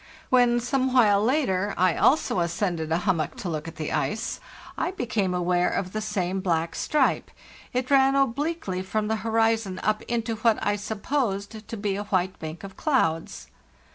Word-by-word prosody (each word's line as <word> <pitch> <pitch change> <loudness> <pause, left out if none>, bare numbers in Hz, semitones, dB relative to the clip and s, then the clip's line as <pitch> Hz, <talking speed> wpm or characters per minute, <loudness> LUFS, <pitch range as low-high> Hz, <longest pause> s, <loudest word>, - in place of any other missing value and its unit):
When, 245 -1 +5
some 260 +2 0
while 210 -5 +5
later, 210 -7 +1
I 185 -2 +3
also 280 - +3
ascended 170 -2 -1
a 165 - +3
hummock 165 -7 0
to 185 - -5
look 155 -1 -4
at 165 - -8
the 155 -1 -4
ice, 215 +1 -2 0.4
I - - -1
became 225 - -1
aware 180 0 +2
of 185 -1 -3
the 215 - -2
same 195 -3 -1
black 165 -2 0
stripe; 305 - +1 0.5
1t 255 0 0
ran 270 0 +5
obliquely 275 - 0
from 210 +3 -2
the 220 - +1
horizon 225 -3 +1
up 215 +1 +1
into 230 -1 -1
what 225 0 +3
I 205 - +2
supposed 210 -1 -3
to 225 - -6
be 200 -1 -1
a 205 - -4
white 185 -2 -1
bank 160 +2 -7
of 195 -1 -9
clouds. 165 - 0
210 Hz, 170 wpm, -25 LUFS, 185-240 Hz, 0.5 s, When